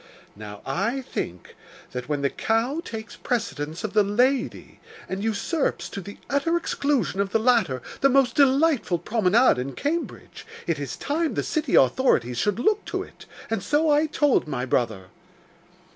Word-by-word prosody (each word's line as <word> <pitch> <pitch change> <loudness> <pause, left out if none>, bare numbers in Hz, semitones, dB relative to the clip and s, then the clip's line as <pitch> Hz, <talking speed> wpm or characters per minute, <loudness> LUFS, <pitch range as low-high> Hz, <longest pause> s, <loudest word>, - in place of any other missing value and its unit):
Now 105 0 -10
I 230 - -1
think 90 - -6 0.4
that 125 +2 -6
when 145 -2 -1
the 140 - +1
cow 235 +8 0
takes 220 -1 -7
precedence 165 -9 -3
of 215 - -3
the 215 - +5
lady, 245 +6 0 0.3
and 190 +2 -4
usurps, 225 - -1
to 200 - -6
the 200 +3 -10
utter 285 +5 +1
exclusion 280 - -1
of 200 - -1
the 210 - +2
latter, 215 - +2 0.2
the 275 - +4
most 265 -2 +3
delightful 275 - +3
promenade 220 - +3
in 135 +2 -4
Cambridge, 310 - -4 0.2
it 165 -3 -1
is 140 -4 -4
time 315 +2 -1
the - - 0
city 305 -5 0
authorities 125 - +3
should 205 -1 +1
look 420 - +1
to - - -3
it; - - -15 0.2
and 225 - -2
so 300 +1 +2
I 300 +2 +3
told 290 - +2
my 130 -4 -2
brother. 110 -8 -1
225 Hz, 160 wpm, -25 LUFS, -, 0.4 s, the